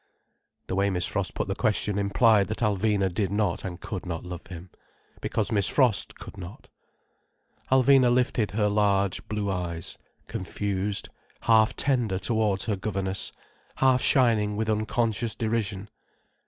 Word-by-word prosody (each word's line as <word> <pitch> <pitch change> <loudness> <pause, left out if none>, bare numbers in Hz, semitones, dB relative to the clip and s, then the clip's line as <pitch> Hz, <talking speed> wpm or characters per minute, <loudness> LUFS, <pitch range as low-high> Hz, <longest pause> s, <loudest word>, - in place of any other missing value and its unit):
The - - -5
way 100 +1 +2
Miss 90 -2 0
Frost 100 -2 -2
put - - -2
the 95 - -1
question 105 -2 0
implied 100 +1 +3
that 110 +2 -3
Alvina 100 -2 +1
did 100 +1 0
not 100 -4 0
and 90 -2 -6
could 95 0 -5
not 85 -2 -5
love 90 -1 -8
him—because 90 +4 -6
Miss 100 -3 +3
Frost 125 -7 +2
could - - -11
not. 90 +2 -10 1.0
Alvina 130 -1 +5
lifted 120 -3 +1
her 105 +1 0
large, 100 -2 +1
blue 105 -2 -2
eyes, 85 -3 -4 0.3
confused, 100 +1 -3 0.3
half 110 -1 +4
tender 120 -9 +1
towards 105 0 0
her 105 - 0
governess, 95 -1 -2 0.4
half 130 -1 +3
shining 110 -5 +3
with 110 +1 0
unconscious 110 +1 -1
derision. 110 -3 -2
105 Hz, 140 wpm, -26 LUFS, 95-110 Hz, 1.0 s, Alvina